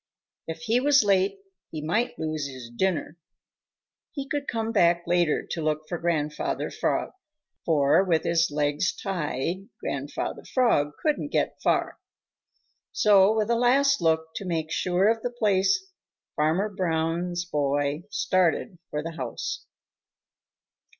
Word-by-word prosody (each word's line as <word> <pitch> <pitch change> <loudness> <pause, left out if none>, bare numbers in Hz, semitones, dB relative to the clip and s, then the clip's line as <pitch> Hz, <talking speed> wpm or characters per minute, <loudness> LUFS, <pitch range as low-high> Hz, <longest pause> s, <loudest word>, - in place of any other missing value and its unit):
If 160 +5 -6
he 240 0 +2
was 285 -1 +4
late, 195 -1 +2 0.3
he 155 - -6
might 210 +11 -1
lose 155 -2 -2
his 130 -3 -9
dinner. 170 -1 -1 0.9
He 275 -3 -5
could 285 0 -3
come 225 -1 -2
back 170 -5 +3
later 175 -2 +1
to 165 - -2
look 155 0 -1
for 175 +1 -4
Grandfather 155 -3 -1
Frog, - - -1 0.5
for 150 +2 +4
with 165 -4 +1
his 170 -1 +2
legs 145 +3 0
tied 175 0 -3
Grandfather 140 +1 -4
Frog 150 - +2
couldn't 300 -1 +1
get - - -1
far. - - 0 0.9
So, 200 -1 +5
with 215 +1 +1
a - - +4
last 275 +4 +3
look 160 -1 +1
to 200 - -5
make 160 -3 -2
sure 180 +4 +2
of 225 0 +2
the 245 - -2
place, 215 - +1 0.4
Farmer 160 +7 +1
Brown's 175 -2 -1
boy 145 0 -1
started 185 -1 0
for 150 0 -3
the 165 - -4
house. 130 -7 -5
175 Hz, 135 wpm, -26 LUFS, 155-210 Hz, 0.9 s, So